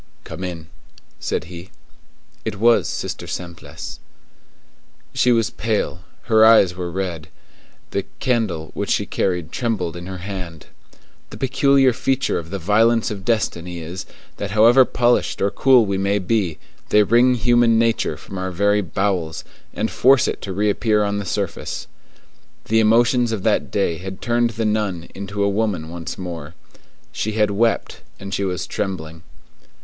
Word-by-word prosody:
"Come 95 - -8
in," 85 -3 -5 0.5
said - - -2
he. 85 +2 -10 0.7
It 110 -2 -3
was 115 +3 +3
Sister - - -5
Simplice. 80 -4 -7 1.1
She 125 - +3
was 115 -2 +2
pale; 105 -7 -2 0.2
her 110 -1 +4
eyes 110 -5 +6
were 90 -1 -4
red; 85 -3 -4 0.6
the - - -2
candle 110 -11 -1
which - - -3
she - - +1
carried 90 -4 -2
trembled 105 -9 -2
in 85 +1 -8
her 95 0 -6
hand. 90 -4 -7 0.6
The - - -10
peculiar 135 0 +3
feature 135 +2 0
of 80 -1 -9
the 100 - -3
violences 110 +6 +2
of 100 -2 -6
destiny 90 -6 -1
is, 85 +3 -7 0.3
that 100 - -4
however 115 +5 +6
polished 120 0 +1
or 100 - +1
cool 130 -4 +5
we 100 -1 -1
may 100 +1 +1
be, 95 -4 0 0.3
they 105 0 +5
wring 120 +4 +4
human 120 0 +3
nature 115 0 +1
from 95 - -8
our 95 0 -2
very 100 +3 +2
bowels, 90 -3 -2 0.3
and - - -2
force 130 0 +4
it - - -3
to 95 - -5
reappear 105 +2 +1
on 100 0 -1
the 100 - -5
surface. 95 0 -3 0.8
The 110 +1 +2
emotions 115 +2 +3
of 105 -4 -3
that - - +1
day 90 -5 0
had 95 0 -7
turned 120 0 +1
the 115 0 -3
nun 105 -6 -1
into 100 +1 -3
a - - +3
woman 100 -6 -1
once 85 -1 -6
more. 85 -3 -7 0.6
She 110 - -3
had 105 -1 +2
wept, 115 +2 0 0.2
and 100 0 -7
she 100 - -1
was 90 -1 -2
trembling. 85 -5 -4
100 Hz, 155 wpm, -21 LUFS, 90-115 Hz, 1.1 s, eyes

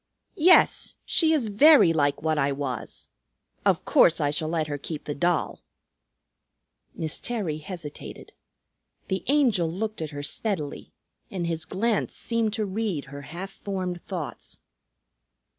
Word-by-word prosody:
"Yes, 360 +3 +5
she 320 -2 +3
is 300 -7 +2
very 220 - +6
like 145 -2 +1
what 155 -1 +1
I 140 0 +2
was. 135 -4 -5 0.5
Of - - +2
course 170 - +5
I 145 -2 +1
shall 155 +1 -2
let 160 -1 0
her 145 -1 -4
keep 155 +1 -6
the 145 - -3
doll." 175 +3 0 1.3
Miss 160 -1 -3
Terry 195 -11 -3
hesitated. 155 -2 -8 0.8
The 190 -2 -1
Angel 245 - +3
looked 215 +2 -4
at 155 - -3
her 145 -1 -6
steadily 155 -3 -3 0.4
and 180 -3 -3
his 165 -1 -3
glance 220 +1 -1
seemed 230 -2 0
to 220 -2 -1
read 195 -6 -2
her 140 - -7
half 175 +7 -7
formed 185 -3 -4
thoughts. 175 -7 -6
175 Hz, 140 wpm, -26 LUFS, 150-215 Hz, 1.3 s, very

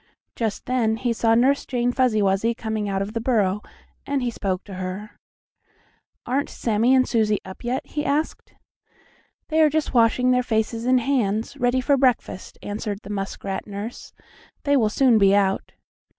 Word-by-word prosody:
Just 220 -3 -3
then 230 -3 +1
he 240 0 0
saw 225 0 +2
Nurse 265 +4 +3
Jane 245 -1 0
Fuzzy 245 -5 +2
Wuzzy 200 +4 +1
coming 220 -2 -3
out 195 0 0
of 205 +2 -7
the 230 - -2
burrow, 210 -5 +1 0.4
and 280 -2 -1
he 240 - -1
spoke 195 -4 -3
to 200 - -10
her: 185 +3 -5 1.1
"Aren't 270 +3 -1
Sammie 230 +3 +2
and 255 -1 +3
Susie 215 -3 +2
up 190 - -10
yet?" 245 +2 -2
he 295 - -4
asked. 305 +1 -2 0.9
"They 320 0 +3
are 310 - +6
just 310 0 -1
washing 245 +1 +3
their 250 0 +3
faces 225 0 -1
and 255 0 +3
hands, 230 -3 0
ready 250 -1 +1
for 280 +2 +2
breakfast," 250 -7 0
answered 205 0 -4
the 205 - -8
muskrat 195 0 -4
nurse. 205 +3 -7 0.5
"They 285 0 +2
will 225 -6 +3
soon 240 0 +4
be 195 0 +5
out." 195 -1 0
230 Hz, 170 wpm, -23 LUFS, 205-255 Hz, 1.1 s, are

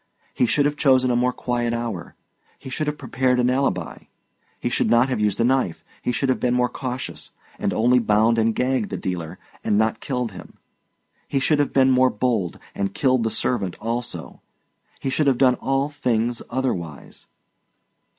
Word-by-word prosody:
He 125 - +2
should 145 +4 +2
have 145 0 0
chosen 130 -3 +4
a - - +2
more 125 +1 +2
quiet 120 -1 -2
hour; 115 -7 -4 0.4
he 130 - -10
should 155 +3 -2
have 150 0 -2
prepared 130 -2 0
an 125 0 +3
alibi; 110 -11 -1 0.5
he - - -2
should - - +1
not 120 +3 +4
have 130 - -1
used 105 -2 0
a - - +3
knife; 125 -8 0 0.2
he - - -1
should 135 +3 0
have 130 - +1
been 125 -1 +1
more 125 0 +2
cautious, 130 -1 -5 0.3
and - - 0
only 125 +3 +3
bound 110 +1 +3
and 115 0 +2
gagged 130 +10 0
the - - -3
dealer, 85 -4 -4 0.3
and 105 - +2
not 110 +1 +1
killed 125 -4 -2
him; 95 - -12 0.7
he 135 - 0
should 145 +2 +2
have 145 - +1
been 135 -1 +4
more 130 0 +5
bold, 105 -7 -1 0.2
and 100 -1 -3
killed 130 -4 +2
the 115 - +1
servant 105 -6 -2
also; 120 +2 -4 0.6
he 135 - -2
should 150 +2 +1
have 135 -3 +3
done 130 -1 +5
all 135 +1 +1
things 120 -5 -1
otherwise. 90 - -4
125 Hz, 185 wpm, -23 LUFS, 115-130 Hz, 0.7 s, more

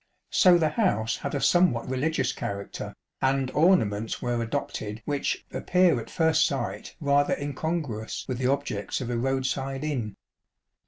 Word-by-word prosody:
So 180 -2 +6
the 160 -2 +2
house 150 - +1
had 140 - -4
a - - 0
somewhat 175 -8 +3
religions 130 +2 0
character, 100 0 -5 0.3
and 135 -1 +1
ornaments 115 - +2
were 120 -1 -1
adopted 110 -1 -4
which 145 -1 -1
" - - -36
appear 180 -7 +3
at 115 - -8
first 160 -1 +3
sight 135 -6 -4
rather 145 -2 +2
incongruous 145 -5 -3
with 125 -2 -3
the 130 - +1
objects 140 -8 -2
of 125 -2 -4
a 120 - -1
road 135 +1 0
side 135 +1 -2
inn." 120 -10 -2
135 Hz, 155 wpm, -27 LUFS, 120-155 Hz, 0.3 s, So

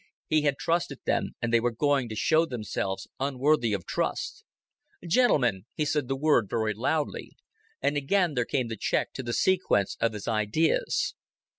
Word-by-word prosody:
He 155 -1 +2
had 145 -2 +1
trusted 170 +5 -1
them, - - 0
and 120 0 -1
they 115 - +6
were 120 +1 +1
going 135 +1 +1
to 110 - -5
show 160 +9 +3
themselves 100 -6 -3
unworthy 135 -2 +1
of 100 -4 -2
trust. - - -2 0.6
"Gentlemen," 125 - +2
he 150 - 0
said 150 -3 0
the 135 - -1
word 135 -7 +2
very 110 -1 0
loudly, 145 +8 -2 0.5
and 140 +1 +2
again 170 +4 +1
there 125 -3 0
came 130 -2 -1
the 115 -1 -5
check - - -1
to - - -5
the 120 -2 -4
sequence 175 - +1
of 115 -1 +2
his 105 - -7
ideas. 110 +8 +1
130 Hz, 170 wpm, -27 LUFS, 115-150 Hz, 0.6 s, they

